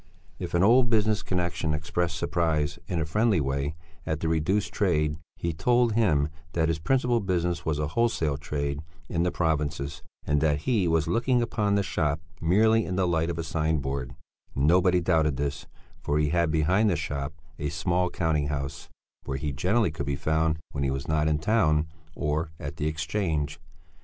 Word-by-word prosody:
If - - -4
an 85 - +4
old 120 +3 +5
business 110 -2 +2
connexion 85 -4 -1
expressed 85 +1 -2
surprise, 80 -3 0
in 85 - -1
a 80 - 0
friendly 105 +3 +2
way, 70 +2 -1 0.3
at 80 0 -2
the 80 - -1
reduced 80 +6 0
trade, 75 -6 +1 0.2
he 85 -1 -2
told 120 +7 +2
him 80 -10 +2 0.2
that 80 -1 +1
his 80 -1 0
principal 125 +5 +2
business 90 -4 -1
was 75 -2 +1
a 75 -1 -1
wholesale 85 -8 +1
trade 70 -1 -3 0.3
in 85 - 0
the 90 - +2
provinces, 75 -1 -1 0.2
and 75 0 +1
that 75 -2 +2
he 105 -3 +1
was 80 -2 +2
looking 120 +1 +2
upon 105 -3 0
the 100 - +2
shop 75 -5 0 0.2
merely 110 +6 +4
in 95 - -3
the 95 -1 +2
light 85 -1 +1
of 85 - -3
a 85 - -2
sign 80 0 0
board; 65 -3 -4 0.4
nobody 90 +6 +4
doubted 80 -5 +2
this, 70 0 -3 0.3
for 75 - 0
he 75 -1 +2
had, 85 +1 +2
behind 85 +8 +3
the 90 - +2
shop, 75 -2 -4 0.2
a 75 -1 -1
small 90 +3 0
counting 80 -4 0
house 70 -1 -4 0.4
where 65 - -2
he 75 +2 -2
generally 90 - +1
could 70 -3 -5
be 70 - 0
found 80 +2 +1
when 70 - -2
he 70 - +1
was 70 +1 -3
not 75 0 +1
in 75 -1 +2
town 80 -4 +2 0.3
or 75 +2 -1
at 75 +2 -6
the 75 - -1
Exchange. 80 -2 -2
80 Hz, 185 wpm, -27 LUFS, 75-90 Hz, 0.4 s, old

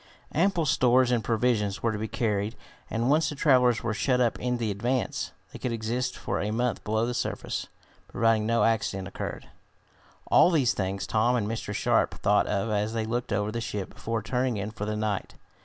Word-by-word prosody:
Ample 175 -1 +2
stores 130 -2 +4
and 120 -3 +1
provisions 110 -3 0
were 115 - +2
to 105 - -4
be 110 - -2
carried 105 -1 -1 0.3
and, 115 +4 0
once 155 0 +3
the 150 - -5
travelers 125 -5 +3
were 115 -1 -1
shut 125 +3 +1
up 120 -2 +1
in 125 0 -1
the 115 -3 -1
Advance, 120 +5 -1 0.2
they - - -8
could 125 - -2
exist 115 +2 -2
for - - -2
a 105 - -1
month 120 +2 -1
below 110 +2 0
the 125 - -2
surface, 120 - -3 0.4
providing 115 -1 +2
no 115 -2 +2
accident 105 -4 0
occurred. 95 - -6 0.8
All - - +6
these 140 -8 +3
things 95 0 -2
Tom 115 +3 +2
and 110 -4 0
Mr. 110 -2 -4
Sharp 100 - +1
thought 105 0 +2
of 105 +2 -1
as 105 +1 0
they 115 -1 -1
looked 120 +2 -2
over 105 +1 0
the 115 +1 -3
ship 100 -4 -4
before 115 0 -3
turning 125 -2 0
in 100 +2 -3
for 105 -1 -5
the 105 0 -2
night. 105 -2 -2
115 Hz, 200 wpm, -27 LUFS, 105-125 Hz, 0.8 s, All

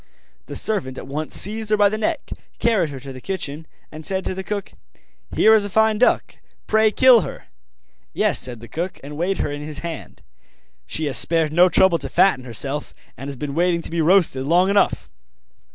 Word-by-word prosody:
The - - -7
servant 130 -12 -2
at - - -7
once 150 +3 -2
seized 215 +2 +2
her 215 - +3
by 205 -1 +5
the 205 - -2
neck, 315 +7 -3 0.3
carried 215 -9 +1
her 140 -2 -8
to 135 0 -9
the 130 - -11
kitchen, 160 -4 -5 0.2
and 155 +1 -10
said 190 +4 -3
to - - -2
the 190 +1 -6
cook: 200 0 -5 0.6
'Here 220 - +5
is 220 -2 +4
a 205 - -3
fine 220 +1 +2
duck; 250 - +1 0.3
pray, 220 0 +3
kill 250 +1 +5
her.' - - -8 0.7
'Yes,' - - 0
said 120 -3 -3
the 120 - -11
cook, 175 - -5
and 145 +1 -8
weighed 180 +5 -1
her 145 - -2
in 145 0 -6
his 150 +1 -6
hand; 165 -3 -8 0.6
'she 160 - -2
has 135 -5 +1
spared 160 +1 +2
no 180 +2 +5
trouble 170 0 +3
to 135 - -5
fatten 135 -5 +2
herself, 135 +5 -3 0.2
and 135 - -8
has 140 - -5
been 140 +2 -5
waiting 170 +1 +1
to - - -6
be 170 0 -1
roasted 160 -6 +3
long 180 +4 +3
enough. 200 -1 +1
170 Hz, 205 wpm, -21 LUFS, 145-200 Hz, 0.7 s, by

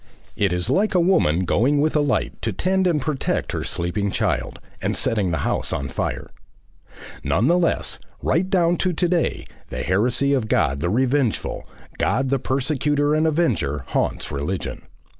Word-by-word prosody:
It 100 -3 +1
is 90 0 -1
like 205 +1 +1
a - - +5
woman 170 - +3
going 135 +11 +2
with 155 +2 +1
a - - +4
light 145 -2 -1
to 115 - -1
tend 185 - +1
and 165 -4 +2
protect 140 0 -2
her - - -3
sleeping 90 +4 -1
child, - - -1 0.2
and - - 0
setting 105 -5 +1
the 80 - 0
house - - -1
on - - -2
fire. - - -3 0.9
None 105 - +1
the 175 +5 +4
less, 170 - 0 0.2
right 185 +3 +1
down 175 -3 +3
to 185 -1 0
to 175 +2 +1
day, 170 -1 0 0.2
the - - -4
heresy 120 +9 +1
of 125 -6 0
God 70 -8 +1
the 85 +4 -1
Revengeful, 130 +2 0 0.3
God 135 0 +1
the 135 0 +1
Persecutor 145 +3 0
and 155 +1 +2
Avenger, 100 - 0
haunts - - -1
religion. 75 +6 -3
135 Hz, 170 wpm, -22 LUFS, 100-165 Hz, 0.9 s, a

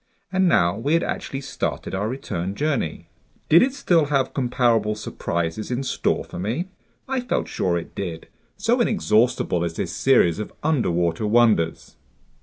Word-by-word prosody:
And 190 -1 +3
now 85 - +3
we 145 +7 +1
had 165 - +2
actually 135 - -4
started 135 -1 -4
our 100 +3 -1
return 95 -7 -4
journey. 140 - -2 0.4
Did 170 - +7
it 265 - +3
still 175 - +3
have 140 -2 0
comparable 120 -5 +1
surprises 85 -2 -3
in 125 +2 -2
store - - 0
for - - -9
me? 125 - -2 0.4
I 265 0 -1
felt 245 - -1
sure 90 -2 0
it 85 - -7
did, 85 -4 -5 0.3
so 230 +5 +2
inexhaustible 115 - +2
is 85 -1 -3
this - - -3
series 110 -10 +3
of 105 - -5
underwater 90 - +1
wonders! 105 -8 +2
120 Hz, 155 wpm, -23 LUFS, 90-150 Hz, 0.4 s, Did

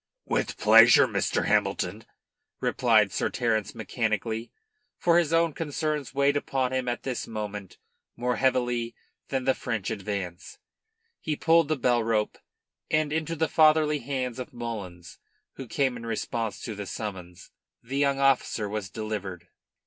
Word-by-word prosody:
"With - - -1
pleasure, - - +7
Mr. - - 0
Hamilton," - - 0 0.5
replied - - +3
Sir - - -1
Terence 110 -4 -1
mechanically 115 0 -2 0.5
for 170 0 +4
his 165 -3 0
own 165 -1 +3
concerns 150 -2 -2
weighed 140 +2 +2
upon 130 -2 -1
him 130 -1 -1
at 120 0 -2
this 130 -3 -3
moment 105 -3 -6 0.4
more 125 +1 -1
heavily 125 -3 0 0.3
than 135 -1 -1
the 130 +1 +3
French 110 -7 -3
advance. 95 -3 -5 0.6
He 155 - -2
pulled 165 +1 +4
the 155 - +1
bell 120 -2 +2
rope, 110 -2 0 0.5
and 155 -1 +1
into 160 +1 -1
the 160 0 +1
fatherly 155 -1 +4
hands 130 -2 -3
of 130 +3 -7
Mullins, 100 -8 -7 0.4
who 135 - -7
came 130 +2 0
in 115 -1 -7
response 115 -1 -3
to 115 - -4
the 100 -1 -6
summons, 90 -5 -7 0.3
the 135 +4 -3
young 140 -1 +2
officer 135 -5 +2
was 100 -2 -4
delivered. 100 -6 -5
120 Hz, 145 wpm, -27 LUFS, 110-140 Hz, 0.6 s, pleasure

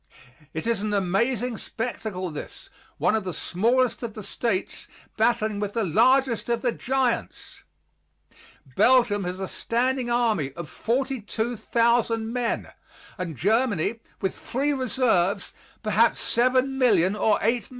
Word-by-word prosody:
It 160 - -5
is 230 -3 0
an 210 0 -1
amazing 225 +5 0
spectacle, 215 -6 -4
this, 150 - -9 0.3
one - - +2
of 220 -2 0
the 180 -3 -5
smallest 240 +6 +1
of 230 -3 -5
the 215 - -7
States, 200 -2 -3 0.3
battling 215 -3 +1
with 205 -1 -3
the 230 - 0
largest 240 - +3
of 235 -1 0
the 245 - +2
giants! 260 0 -2 1.1
Belgium 235 -6 +4
has 180 +1 -4
a 190 - -3
standing 250 +4 -1
army 220 - +1
of 170 0 -7
42,000 235 -2 0
men, 245 -2 -2 0.5
and 170 -6 -4
Germany, 225 - +1 0.2
with 190 -2 0
three 280 +4 -1
reserves, 230 -8 +1 0.3
perhaps 215 +2 +3 0.2
7,000,000 250 -6 +3
or 215 - +3
8,000,000. 235 +2 0
230 Hz, 125 wpm, -25 LUFS, 200-245 Hz, 1.1 s, Belgium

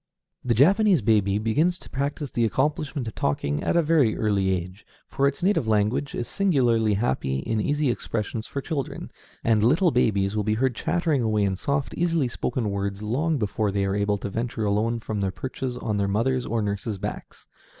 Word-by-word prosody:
The 120 -2 +1
Japanese 185 - +4
baby 100 -2 +3
begins 150 +12 +1
to - - -15
practice 140 +1 -3
the 120 - 0
accomplishment 140 +2 -1
of 110 - -5
talking 70 0 -1
at - - 0
a 170 - +4
very 150 -8 +3
early 100 -3 +1
age, 90 +2 -3 0.2
for 140 - +1
its 140 +4 -3
native 190 - +2
language 110 +6 +1
is 120 - -3
singularly 120 - +2
happy 65 - -1
in 110 +11 -1
easy 145 +1 +1
expressions 110 0 -4
for 140 - -4
children; 140 -3 -4 0.3
and 110 -2 +3
little 165 - +4
babies 105 -5 +1
will 105 - 0
be 105 +1 +1
heard 130 +2 +1
chattering 160 +1 0
away 110 -2 +1
in 95 -1 +1
soft, 140 +8 -2
easily 165 -5 +1
spoken 120 -2 -2
words 100 +1 -3
long 145 +9 0
before 105 -2 -1
they 100 0 0
are 95 0 -1
able 100 0 +1
to 100 - -5
venture 115 0 -2
alone 110 +3 +1
from 105 -2 -3
their 95 - +1
perches 130 +4 -5
on 110 -4 -2
their 100 -1 +1
mothers' 120 +5 0
or 115 -1 0
nurses' 100 +1 -3
backs. - - -7
115 Hz, 190 wpm, -25 LUFS, 105-140 Hz, 0.3 s, Japanese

